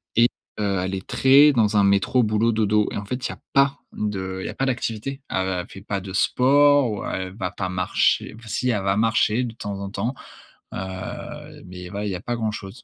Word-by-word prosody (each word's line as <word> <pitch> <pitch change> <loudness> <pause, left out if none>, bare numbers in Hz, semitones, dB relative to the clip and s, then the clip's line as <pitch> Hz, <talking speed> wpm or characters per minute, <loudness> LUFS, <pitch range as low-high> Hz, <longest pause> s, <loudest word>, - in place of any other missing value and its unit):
et 120 +2 +5 0.3
heu, 100 -3 0
elle 95 +1 -3
est 95 - -7
très 140 +3 +6
dans 110 -4 +2
un 100 - +5
métro, 100 +5 +3
boulot, 110 +2 +2
dodo 105 -1 +2
et - - -4
en 100 - -5
fait, 125 +4 -4
il - - -10
y - - -4
a - - -14
pas 140 0 +3
de 95 -3 -3
il - - -6
y - - -4
a - - -5
pas 135 - 0
d'activité. 125 +2 -3
Elle 95 -1 -1
fait 95 - -11
pas 100 -1 -3
de 95 0 -8
sport 135 +6 +4
ou 105 - -4
elle 95 0 -4
va 90 -1 -2
pas 95 -2 -4
marcher 90 +3 +1
enfin, 115 - -14
si, 125 - -1
elle 105 -4 -1
va 95 0 +1
marcher 115 +1 +2
de 115 - -6
temps 100 -3 -5
en 100 - -5
temps, 110 +6 -2 0.6
heu, 95 -1 -7
mais 90 0 -9
voilà, 100 +2 -4
il 100 - -2
y - - -2
a 90 - -6
pas 120 0 -3
grand-chose. 110 0 -5
105 Hz, 235 wpm, -23 LUFS, 95-120 Hz, 0.6 s, très